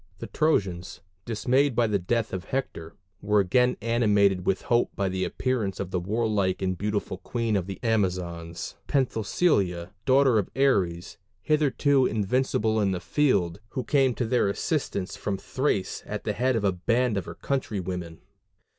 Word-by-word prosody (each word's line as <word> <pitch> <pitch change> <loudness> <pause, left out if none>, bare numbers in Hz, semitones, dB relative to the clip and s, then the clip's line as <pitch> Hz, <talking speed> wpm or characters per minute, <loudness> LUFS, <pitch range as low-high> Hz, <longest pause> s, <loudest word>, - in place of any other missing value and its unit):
The - - -6
Trojans, 90 - -1 0.2
dismayed 130 +4 +1
by 120 - +3
the 105 -2 +1
death 115 +4 -1
of 95 0 -4
Hector, 125 -11 -4 0.3
were 105 +1 +2
again 125 +7 +2
animated 105 -5 +2
with 95 - +1
hope 120 0 +2
by 100 -1 0
the 95 0 -2
appearance 115 -3 -2
of 95 -2 -4
the 90 - 0
warlike 100 -1 0
and 95 -1 0
beautiful 100 -1 -3
queen 115 +2 -2
of 95 -2 -1
the 95 - -6
Amazons, 90 -6 -2
Penthesilia, 105 - +1
daughter 130 -3 +4
of 100 - -3
Ares, 95 -11 +1 0.3
hitherto 145 -3 +3
invincible 110 0 0
in 100 -2 +1
the 90 - -2
field, 100 - +1
who 130 - -3
came 135 -4 +2
to 120 - -1
their 115 -3 +2
assistance 100 - -2
from 100 -1 -3
Thrace 105 -5 -2
at - - -4
the - - -1
head 130 +2 +1
of 110 - -1
a 100 - +3
band 115 +6 0
of 95 -4 -2
her - - -8
country 130 -6 -2
women. 90 -3 -5
105 Hz, 165 wpm, -26 LUFS, 95-125 Hz, 0.3 s, daughter